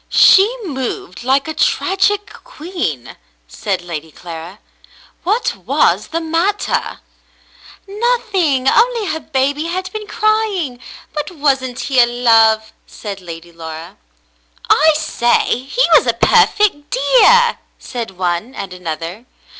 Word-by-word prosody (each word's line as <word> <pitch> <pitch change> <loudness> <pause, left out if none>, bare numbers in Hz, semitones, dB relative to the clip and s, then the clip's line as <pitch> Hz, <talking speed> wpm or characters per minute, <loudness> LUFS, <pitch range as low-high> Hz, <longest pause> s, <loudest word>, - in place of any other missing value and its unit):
" - - -42
She 395 +4 +6
moved 260 - -5
like 270 +3 +1
a 315 - -3
tragic 390 +5 0
queen," 325 - -5 0.3
said 185 - -3
Lady 160 -2 -7
Clara. 170 +3 -9 0.7
"What 425 +7 0
was - - +1
the 330 - -3
matter 335 +5 -1 0.2
?" - - -26
" - - -22
Nothing, 395 - 0
only 470 - +3
her 320 - -3
baby 285 +1 -1
had 370 +2 -4
been 430 -1 -6
crying; 425 - 0 0.3
but 300 -1 -3
wasn't 270 -6 -1
he 265 -2 +1
a 240 - +6
love 225 -2 +3
?" - - -43
said 200 -3 -8
Lady 170 -1 -10
Laura. 160 0 -9 0.8
"I 315 +2 +5
say! 240 -6 +1
He 275 - -1
was - - +5
a - - +3
perfect 370 -9 +2
dear 485 -1 +4
!" - - -42
said 230 -7 -7
one 180 +7 -2
and 190 -2 -6
another. 170 +4 -6
275 Hz, 135 wpm, -16 LUFS, -, 0.8 s, She